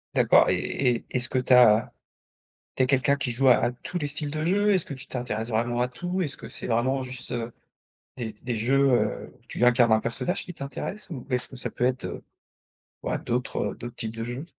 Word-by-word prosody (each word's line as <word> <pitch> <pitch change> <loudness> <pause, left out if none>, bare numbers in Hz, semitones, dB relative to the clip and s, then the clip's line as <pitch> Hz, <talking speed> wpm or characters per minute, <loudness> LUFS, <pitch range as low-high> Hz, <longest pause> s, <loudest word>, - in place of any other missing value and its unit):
D'accord - - +5
et - - +2
et 125 -3 +1
et 115 - -7
est-ce 125 -1 0
que 130 - 0
tu 125 0 +2
as 115 -3 +6 0.9
tu - - +2
es - - +4
quelqu'un 140 +2 +3
qui 130 -3 -2
joue 130 +3 +3
à 125 - +8
à 120 - 0
tous 125 +8 -8
les 145 -4 -2
styles 145 0 -4
de 155 +1 -3
jeu? 205 +4 +3
Est-ce 185 - +2
que - - -8
tu 135 +2 -11
t'intéresses 115 -3 -3
vraiment 120 +1 0
à 125 - +2
tout? 175 +9 -3
Est-ce 155 -7 -2
que - - -10
c'est - - -5
vraiment 130 +3 +1
juste, 125 -1 -7
heu, 120 -1 -3 0.6
des 115 -3 -4
des 125 -1 -2
jeux, 135 +5 +3
heu, 120 - 0
où - - -28
tu - - 0
incarnes 120 -2 +5
un 110 - +5
personnage, 115 +11 -2
qui 180 - -8
t'intéressent? 145 +9 -6
Ou 135 -7 -6
est-ce 125 -1 -1
que 130 - -11
ça 125 - -4
peut - - -2
être 130 0 -1
heu, - - -5 0.8
ouais, - - -1
d'autres, 125 +1 -3
heu, - - -9
d'autres 120 0 -8
types 110 0 -5
de 115 - -4
jeux? 120 +6 -5
125 Hz, 240 wpm, -26 LUFS, 120-140 Hz, 0.9 s, à